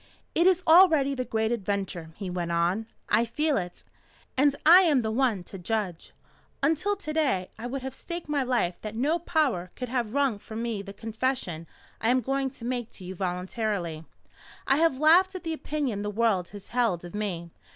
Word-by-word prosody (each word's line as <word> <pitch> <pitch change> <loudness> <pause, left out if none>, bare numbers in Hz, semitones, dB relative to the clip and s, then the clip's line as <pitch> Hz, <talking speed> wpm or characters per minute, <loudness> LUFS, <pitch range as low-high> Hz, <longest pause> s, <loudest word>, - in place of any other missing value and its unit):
"It 340 +2 +4
is 370 -1 +3
already 320 -5 +6
the 255 -2 -2
Great 220 -1 0
Adventure," 195 -6 -2
he 200 - -6
went 175 -1 -3
on. 175 +6 +1 0.2
"I 215 +2 +3
feel 295 +6 0
it. 180 -2 -5 0.5
And 280 +1 +3
I 345 +4 +9
am 295 -9 +3
the 220 - -1
one 230 -6 +1
to 195 - -10
judge. 185 -3 -3 0.5
Until 325 +8 +2
to 325 -6 -6
day 260 -13 +1
I 235 - -4
would 265 +1 -4
have 265 -1 -5
staked 340 +4 -6
my 295 -2 0
life 245 -9 0
that 215 0 -6
no 295 +9 +1
power 290 - 0
could 250 -2 -5
have 245 -2 -2
wrung 275 -7 +2
from 220 +2 -6
me 230 -4 -2
the 200 0 -9
confession 220 -6 -3 0.3
I 225 - +2
am 255 +1 +3
going 270 +2 -1
to 250 -3 -11
make 245 -2 -2
to 190 - -11
you 185 - -5
voluntarily. 180 -2 -3 0.6
I 270 - +3
have 325 -4 +3
laughed 350 +6 +5
at 370 - -6
the 325 -1 -2
opinion 290 -9 -2
the 205 - -2
world 205 -4 +1
has 205 -1 -11
held 230 -8 0
of 175 - -10
me. 180 -5 -3
235 Hz, 195 wpm, -27 LUFS, 195-285 Hz, 0.6 s, I